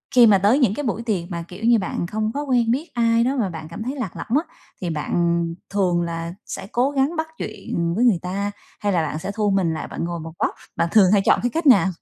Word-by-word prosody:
khi 240 -2 +8
mà 205 -2 +6
tới 210 +9 +3
những 235 -7 +3
cái 290 - -3
buổi 230 -1 -2
tiệc 195 -7 -2
mà, 170 -2 -4
kiểu 180 +5 -10
như, 235 0 +5
bạn 180 -2 -3
không 215 +3 -2
có 290 - -2
quen 245 -5 +2
biết 295 +6 -1
ai 230 -1 +3
đó 260 +3 0
mà 200 - 0
bạn 160 -2 -7
cảm 195 +6 -6
thấy 260 +4 -3
lạc 225 -10 -4
lõng 240 - -1
á, - - -27 0.3
thì 180 - -2
bạn 170 +2 0 0.2
thường 180 -4 +1
là 170 0 -4
sẽ - - -6
cố 255 +4 +2
gắng 280 +4 +1
bắt 320 0 -1
chuyện 170 0 -3
với 240 - +3
người 215 -8 +4
ta, 200 +3 -2 0.3
hay 205 -1 0
là 170 - +2
bạn 155 - -4
sẽ 195 - -4
thu 210 -1 +1
mình 185 -4 +1
lại, 155 - -5
bạn - - -5
ngồi 170 0 -4
một 160 0 -8
góc, - - 0 0.2
bạn 170 - +1
thường 195 -4 +6
hay 205 -2 +5
chọn - - +4
cái 245 - +2
cách 320 +3 -1
nào? 205 -7 +7
205 Hz, 270 wpm, -22 LUFS, 175-240 Hz, 0.3 s, khi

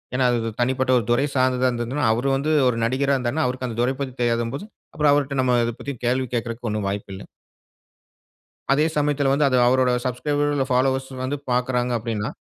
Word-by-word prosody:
ஏனா 130 - +1
அது 115 -1 -1
தனிப்பட்ட 130 +1 +1
ஒரு 120 - 0
துறை 120 +4 +3
சார்ந்ததா 130 -1 +2
இருந்ததுனா, 120 +4 -3
அவரு 120 +4 -1
வந்து 145 +3 -2 0.2
ஒரு 125 -2 +1
நடிகரா 135 +3 +1
இருந்தாருன்னா, 130 +3 -1
அவருக்கு 125 0 -3
அந்த 115 - -7
துறை 125 +2 +1
பத்தி 130 -2 -4
தெரியாதம்போதும், 120 - -1 0.2
அப்புறம் 150 -1 +3
அவரிட்ட 140 -1 0
நம்ம 125 -1 +2
இத 120 - -2
பத்தி 140 +3 -5
கேள்வி 130 +2 +1
கேட்கதுக்கு 115 +1 -3
ஒண்ணும் 105 -2 -2
வாய்ப்பு 100 0 -5
இல்ல. 95 - -9 1.5
அதே 145 +3 +3
சமயத்துல 145 -2 +1
வந்து 140 +1 +3
அது 130 - +2
அவரோட 130 0 +3
சப்ஸ்கரைபர் 145 +4 0
இல்ல 135 -2 +1
ஃபாலோயர்ஸ் 130 +1 +1
வந்து 140 +3 -2
பார்க்குறாங்க. 125 0 0
அப்டின்னா 110 -2 -3
130 Hz, 185 wpm, -23 LUFS, 120-140 Hz, 1.5 s, துறை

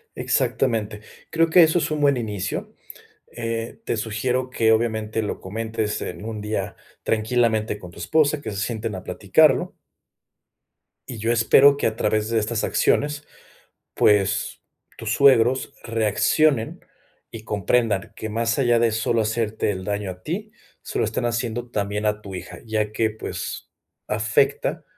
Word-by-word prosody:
Exactamente, 105 -2 0 0.3
creo 165 0 +2
que 175 +1 +7
eso 160 +2 +3
es 155 - -2
un 155 -1 -1
buen 140 -2 +4
inicio. 105 -5 -4 0.6
Eh, 115 -1 -4
te - - -1
sugiero 125 +4 -1
que 115 -3 +2
obviamente 110 -1 0
lo 105 - -4
comentes 110 +1 -3
en - - -6
un 110 -2 -5
día, 105 +1 -3 0.3
tranquilamente 110 -1 +1
con 90 - -10
tu - - -17
esposa, 150 - +2
que 110 - -5
se 100 - -6
sienten 110 0 -3
a 95 - -7
platicarlo- - - +3 1.4
y 125 - -6
yo 115 +2 0
espero 135 +5 +5
que - - +1
a 110 - -2
través 110 -1 0
de 115 - +1
estas 110 +1 -2
acciones, 150 0 +1 0.7
pues, 100 -2 +2 0.4
tus 110 -1 -2
suegros 130 0 +4
reaccionen 115 +4 +1 0.5
y 110 -1 -9
comprendan 105 0 0
que 110 - -5
más 115 +3 0
allá 120 -3 +3
de 115 -1 +3
solo 115 +1 +1
hacerte 110 -1 -1
el 95 -2 -6
daño 100 -2 -2
a 90 0 -12
ti, 210 +7 -4 0.3
se - - -4
lo - - +2
están - - -2
haciendo 120 0 -2
también 105 0 -2
a 105 0 0
tu 100 -2 -8
hija, 90 +2 -8
ya 110 -1 -1
que, 110 +1 +1
pues, 110 - -6 0.4
afecta 105 0 +1
110 Hz, 155 wpm, -23 LUFS, 105-120 Hz, 1.4 s, que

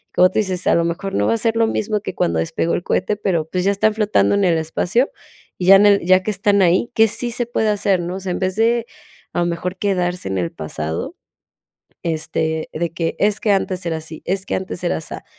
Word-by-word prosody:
Como 180 - +6
tú - - 0
dices, 185 -3 -1
a - - +4
lo 170 - +2
mejor 170 +4 -3
no 105 - +1
va - - +2
a - - -1
ser 225 0 0
lo 225 0 +3
mismo 215 -1 -1
que - - -6
cuando 85 -1 0
despegó 80 - -1
el - - -3
cohete, 205 +4 0
pero, 175 -6 0
pues, 180 +1 -1
ya 200 - +4
está 200 +2 +2
flotando 210 - +2
en 200 -1 +2
el 170 -2 +3
espacio 175 - 0 0.5
y 180 - -3
ya 195 - +10
en 205 - +4
él, 200 -1 +5
ya 185 +1 +4
que 215 - -1
están 200 0 +2
ahí, 185 +5 +3
que 225 0 +5
sí 240 +3 -1
se 240 +1 -1
puede 220 -2 0
hacer, 205 -2 +1
¿no? 175 +2 -4
O - - -4
sea, 190 -1 -3
en - - -3
vez 185 0 -1
de 230 +1 +2 0.5
a - - -1
lo - - +1
mejor 175 +2 -3
quedarse 180 - -1
en 95 - -2
el 85 -2 -2
pasado, 80 +1 -5 0.9
este, 160 -1 -2
de 165 +1 -3
que: 165 -2 -2
"Es 205 0 +1
que 210 - +2
antes 185 -2 -1
era 165 -1 -1
así, 160 0 -10
es 190 +1 -1
que - - -2
antes 185 -2 -5
era 175 - 0
asa". 160 - -8
185 Hz, 250 wpm, -19 LUFS, 170-205 Hz, 0.9 s, ya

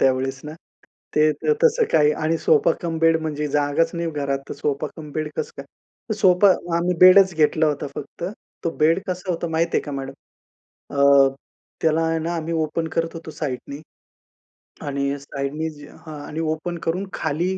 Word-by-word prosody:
त्यावेळेस 135 0 +1
ना. 150 - -6 0.6
ते 155 0 +4 0.3
तसं 470 -1 +4
काही 150 -1 +5
आणि 160 +2 0
सोफा 155 - +3
कम 165 -1 -2
बेड 165 0 +4
म्हणजे 150 -1 -2
जागाच 145 +3 +1
नाही 170 -1 -2
घरात 140 -2 -2
तर - - -5
सोफा 145 +1 -2
कम 150 -2 -9
बेड 155 -1 -2
कसं 155 - -3
काय, 140 - -7 0.5
तर - - +1
सोफा 195 -1 +5 0.3
आम्ही 175 +1 +1
बेडच 185 0 +8
घेतलं 155 +1 +3
होतं 150 -1 -1
फक्त. - - -7 0.4
तो 165 - +1
बेड 165 +4 +3
कसं 185 +1 -3
होत 165 - -4
माहिती 165 +1 +1
आहे - - +3
का 145 - -7
मॅडम, 135 0 -5 0.8
अ, 140 -1 +6 0.5
त्याला 160 0 +2
आहे 165 0 0
ना 170 +2 -2
आम्ही 165 0 -3
ओपन 160 0 -1
करत 165 0 0
होतो 165 -1 -8
साइडनी 140 0 -5 1.1
आणि 140 0 -1
साइडनी 140 +3 -4
जी 145 -2 -12
हां 155 -2 -11
आणि 155 - -5
ओपन 170 +2 -5
करून 180 +4 -1
खाली 175 +6 -1
155 Hz, 175 wpm, -22 LUFS, 145-165 Hz, 1.1 s, बेडच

